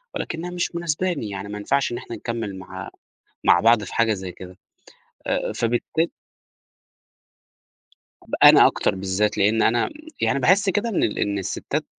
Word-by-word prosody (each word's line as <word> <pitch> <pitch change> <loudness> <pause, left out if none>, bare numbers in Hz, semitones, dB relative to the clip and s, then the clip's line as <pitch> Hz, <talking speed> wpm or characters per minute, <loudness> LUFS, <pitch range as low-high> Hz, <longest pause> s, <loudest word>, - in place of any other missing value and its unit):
ولكنها 170 +2 -4
مش 175 -1 -3
مناسباني، 170 - -2
يعني 100 0 -6
ما 105 - -5
ينفعش 130 +7 0
إن 120 - -3
إحنا 115 - -7
نكمّل 115 -3 -4
مع 95 +1 -8 0.6
مع 85 - +5
بعض 115 0 +4
في - - -9
حاجة 115 -1 +2
زي 95 -2 -7
كده، 90 +1 -12 0.7
آآ، - - -1
فبالتا 120 +8 0 2.2
ب - - -6
أنا - - +9
أكتر - - +1
بالذات، 95 +2 -1
لأن 110 +3 +3
أنا 120 +1 +2 0.3
يعني - - +1
باحس 190 +9 +3
كده 205 +5 0
إن 215 - 0
ال 105 - 0
إن 100 -1 -1
الستات 95 - -3
115 Hz, 155 wpm, -23 LUFS, 100-160 Hz, 2.2 s, أنا